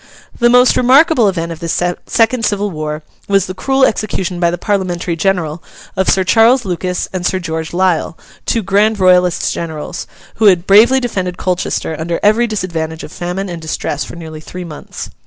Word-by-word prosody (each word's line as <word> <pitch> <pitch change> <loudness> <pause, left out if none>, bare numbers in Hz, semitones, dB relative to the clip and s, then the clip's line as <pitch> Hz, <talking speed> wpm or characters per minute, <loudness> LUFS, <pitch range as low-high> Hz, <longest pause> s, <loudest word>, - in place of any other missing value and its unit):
The 240 -1 +4
most 250 +1 +5
remarkable 260 - +4
event 170 -3 -3
of 165 - -7
this 170 -2 -2 0.3
second 230 +1 +1
civil 205 -1 0
war 155 -1 -5 0.2
was 195 -2 +2
the 185 - -6
cruel 265 +7 +2
execution 190 -5 -2
by 170 -1 +2
the 175 - -3
Parliamentary 180 -3 -2
General, 170 -3 -1 0.3
of 190 - +1
Sir 190 - +3
Charles 230 +6 +4
Lucas 180 0 -2
and 185 -2 -3
Sir 185 - 0
George 160 -2 -4
Lisle, 175 -2 0 0.3
two 230 - 0
grand 205 +3 +2
Royalist 180 -1 +3
generals, 160 -3 -6 0.3
who 220 - +2
had 180 -4 +5
bravely 220 +7 +6
defended 185 -8 -3
Colchester 180 -3 -2
under 170 +1 -2
every 220 +3 +3
disadvantage 165 -6 -4
of - - -9
famine 180 +2 -4
and 170 -2 -6
distress 155 -2 -3
for - - -9
nearly 160 -2 -9
three 180 +3 -8
months. 155 -3 -9
185 Hz, 175 wpm, -15 LUFS, 170-215 Hz, 0.3 s, bravely